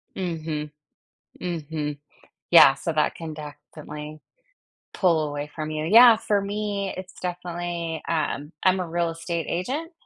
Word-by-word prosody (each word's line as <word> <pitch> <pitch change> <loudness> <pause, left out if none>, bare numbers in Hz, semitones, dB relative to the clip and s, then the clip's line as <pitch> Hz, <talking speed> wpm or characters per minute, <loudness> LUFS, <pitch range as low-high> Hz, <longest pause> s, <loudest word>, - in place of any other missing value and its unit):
Mhm. 160 -4 -3 0.7
Mhm. 155 -4 -4 0.5
Yeah. 150 -5 +9
So 165 - -3
that 155 -1 +1
can 160 -2 -7
definitely 150 0 -9 0.7
pull 165 -5 +2
away 145 0 -4
from 155 -1 -4
you. 155 0 -3
Yeah, 230 +5 +8
for 210 -2 0
me, 200 -1 -3
it's 185 0 -8
definitely 175 -2 -4
um, 155 -2 -2
I'm 185 0 +4
a 180 - -3
real 170 0 0
estate 165 0 -4
agent, 275 - -3
165 Hz, 130 wpm, -25 LUFS, 155-185 Hz, 0.7 s, Yeah